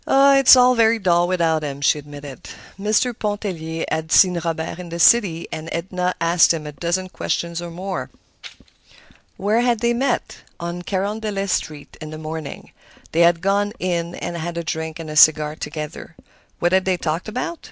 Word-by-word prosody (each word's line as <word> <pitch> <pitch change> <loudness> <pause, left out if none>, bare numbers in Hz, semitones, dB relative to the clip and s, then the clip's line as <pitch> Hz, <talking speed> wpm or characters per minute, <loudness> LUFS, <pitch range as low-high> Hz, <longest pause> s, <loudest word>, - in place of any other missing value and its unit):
"It's 275 -1 +7
very 240 -3 +4
dull 175 -4 +2
without 165 -3 +1
him," 140 -2 -5
she 145 +1 +2
admitted. 145 -2 -10 0.3
Mr. 215 +4 +1
Pontellier 190 -7 -4
had 160 +1 -2
seen 180 -3 +5
Robert 165 0 -3
in 180 -1 -8
the 170 - -5
city, 170 -4 +4
and 155 +1 -6
Edna 180 +1 -2
asked 170 0 +4
him 155 -2 -7
a 150 - -6
dozen 170 +6 -2
questions 170 -2 -3
or 175 - -6
more. 185 +3 -5 1.3
Where 210 +4 +1
had 240 -2 +1
they 235 0 +2
met? 250 +1 -1 0.2
On 170 +1 -5
Carondelet 200 +1 -2
Street, 150 -5 -4
in 155 - -7
the 155 - -8
morning. 155 -2 -7 0.4
They 165 - -1
had 170 -1 +4
gone 200 +2 0
"in" 175 -1 -2
and 175 - -5
had 170 +1 -5
a 170 - -2
drink 160 0 -4
and 165 -1 -8
a - - -6
cigar 155 0 +5
together. 155 +1 -7 0.4
What 175 - 0
had 190 0 +2
they 185 -1 +1
talked 165 +3 -3
about? 255 +10 -4
175 Hz, 175 wpm, -21 LUFS, 160-205 Hz, 1.3 s, It's